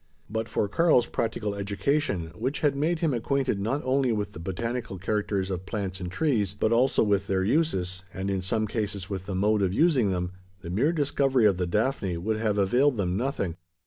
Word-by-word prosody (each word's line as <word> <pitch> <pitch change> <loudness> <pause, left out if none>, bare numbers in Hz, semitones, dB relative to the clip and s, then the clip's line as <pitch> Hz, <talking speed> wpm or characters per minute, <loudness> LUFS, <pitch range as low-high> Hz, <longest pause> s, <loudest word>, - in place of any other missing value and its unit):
But 110 +1 -2
for 105 - 0
Karl's 140 - +4
practical 110 -3 -2
education 100 - -1
which 125 +10 -3
had 145 -2 +2
made 160 +4 0
him 160 -5 +2
acquainted 130 -2 0
not 115 +9 -1
only 130 -1 +2
with 105 -2 -2
the 100 - -10
botanical 105 +4 -3
characters 100 0 -1
of 90 -1 -4
plants 95 -2 -3
and 90 -1 -5
trees, 105 - 0
but 110 - +2
also 125 +2 +3
with 100 -2 +1
their 95 -1 +1
uses 95 - 0
and 95 +2 -3
in 95 -1 -1
some 110 +4 0
cases 100 -3 -3
with 95 -1 -4
the 95 - -3
mode 105 +2 +2
of 95 0 +1
using 145 - +3
them 90 -1 -1 0.3
the 85 - -6
mere 125 - +2
discovery 140 -5 +2
of 100 -3 +4
the 90 -1 -1
daphne 105 -2 0
would 110 +6 -1
have 110 -2 0
availed 120 +7 +3
them 90 -3 0
nothing. 100 - -2
105 Hz, 200 wpm, -27 LUFS, 95-130 Hz, 0.3 s, Karl's